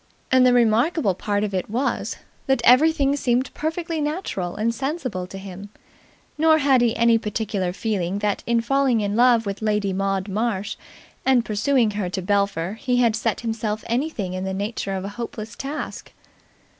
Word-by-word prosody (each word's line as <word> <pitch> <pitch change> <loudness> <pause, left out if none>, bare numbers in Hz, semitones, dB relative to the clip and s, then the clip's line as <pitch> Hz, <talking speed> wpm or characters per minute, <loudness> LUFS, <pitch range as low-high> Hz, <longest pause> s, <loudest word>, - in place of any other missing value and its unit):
And 255 -1 +6
the - - +5
remarkable 235 - +3
part 205 +3 -1
of 205 -2 -2
it 185 +1 -2
was 245 +6 -1 0.3
that 265 -3 +2
everything 280 +2 +5
seemed 255 -2 0
perfectly 325 0 -3
natural 295 - -3
and 225 +2 0
sensible 255 - -3
to 195 - -9
him, 195 +1 -9 0.7
nor 315 0 +5
had 275 -4 +4
he 235 -1 +2
any 230 -1 +4
particular 210 -4 -2
feeling 195 -2 -2
that 205 -1 -1
in 235 -1 +2
falling 260 -1 +2
in 205 0 -1
love 240 -1 +4
with 200 +1 -4
Lady 210 -2 0
Maud 195 0 -1
Marsh 210 0 -2 0.5
and 255 -3 +3
pursuing 225 +2 +2
her 205 -3 -2
to 190 - -3
Belpher 200 -1 0
he 250 -2 +1
had 235 -3 +3
set 225 -1 -1
himself 220 -2 -3
anything 235 - -2
in 185 0 -3
the 190 0 -3
nature 200 -1 -3
of 190 0 -4
a - - -4
hopeless 225 -1 -6
task. 280 +3 -6
225 Hz, 170 wpm, -23 LUFS, 200-255 Hz, 0.7 s, And